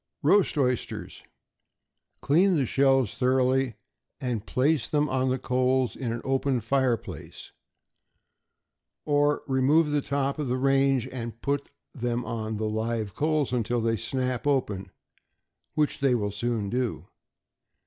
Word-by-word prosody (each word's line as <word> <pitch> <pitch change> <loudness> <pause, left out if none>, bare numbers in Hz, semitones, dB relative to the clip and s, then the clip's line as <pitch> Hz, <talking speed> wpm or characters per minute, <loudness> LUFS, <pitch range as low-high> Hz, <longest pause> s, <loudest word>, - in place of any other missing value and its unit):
=Roast 185 +3 +4
Oysters.= 125 -3 -2 1.0
Clean 180 +6 +3
the 140 -4 +2
shells 135 -2 +2
thoroughly, 130 -1 +2 0.4
and 120 -5 -2
place 135 -2 +1
them 150 0 +2
on 130 -1 0
the 130 - +1
coals 130 -2 +1
in 125 -4 -3
an 115 0 -4
open 135 -1 +1
fire 125 +1 +1
place, - - -10 1.5
or 145 0 +2
remove 145 +4 +3
the 145 -1 +1
top 140 +1 -1
of 145 -4 -2
range, 135 0 +2
and 115 -2 -6
put 140 0 -1 0.2
them 120 -1 -2
on 110 -1 -3
the 110 - -2
live 110 -1 -2
coals, 150 - 0
until 120 0 0
they 115 0 +1
snap 125 +4 -2
open, 110 -9 0 0.9
which 150 -1 +1
they 135 -3 +3
will 105 -3 -1
soon 105 -1 -2
do. 125 -1 -2
130 Hz, 130 wpm, -27 LUFS, 115-140 Hz, 1.5 s, =Roast